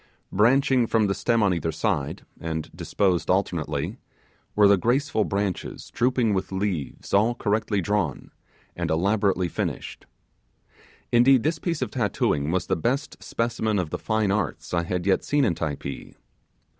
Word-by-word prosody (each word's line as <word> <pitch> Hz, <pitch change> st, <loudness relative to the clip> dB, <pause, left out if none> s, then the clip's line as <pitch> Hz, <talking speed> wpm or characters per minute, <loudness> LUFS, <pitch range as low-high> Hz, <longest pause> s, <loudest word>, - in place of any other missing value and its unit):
Branching 125 Hz, +3 st, +3 dB
from 110 Hz, -1 st, +2 dB
the 100 Hz, -, +1 dB
stem 115 Hz, +1 st, +1 dB
on 100 Hz, -3 st, +3 dB
each 80 Hz, -2 st, -2 dB
side, 70 Hz, -2 st, -1 dB, 0.2 s
and 80 Hz, -1 st, -4 dB
disposed 90 Hz, -5 st, 0 dB
alternately, 85 Hz, -, -1 dB, 0.6 s
were 105 Hz, -1 st, +6 dB
the 100 Hz, -, +6 dB
graceful 120 Hz, +2 st, +1 dB
branches 100 Hz, -2 st, -3 dB
drooping 125 Hz, -3 st, +1 dB
with 95 Hz, 0 st, -2 dB
leaves 95 Hz, -7 st, -3 dB
all 110 Hz, +4 st, +4 dB
correctly 105 Hz, -2 st, 0 dB
drawn 95 Hz, -6 st, -1 dB, 0.4 s
and -, -, -2 dB
elaborately 95 Hz, +2 st, +1 dB
finished. -, -, -4 dB, 1.0 s
Indeed 125 Hz, +1 st, +5 dB
the 105 Hz, -, 0 dB
best 135 Hz, -, -2 dB
specimen 110 Hz, -2 st, -1 dB
of 90 Hz, -5 st, -2 dB
the -, -, -3 dB
Fine 110 Hz, -3 st, 0 dB
Arts 100 Hz, -5 st, -2 dB
I 85 Hz, -1 st, +1 dB
had 90 Hz, 0 st, -2 dB
yet 95 Hz, -1 st, +2 dB
seen 145 Hz, -2 st, +2 dB
in 105 Hz, -, +2 dB
Typee. 70 Hz, -4 st, -5 dB
100 Hz, 130 wpm, -25 LUFS, 85-115 Hz, 1.0 s, were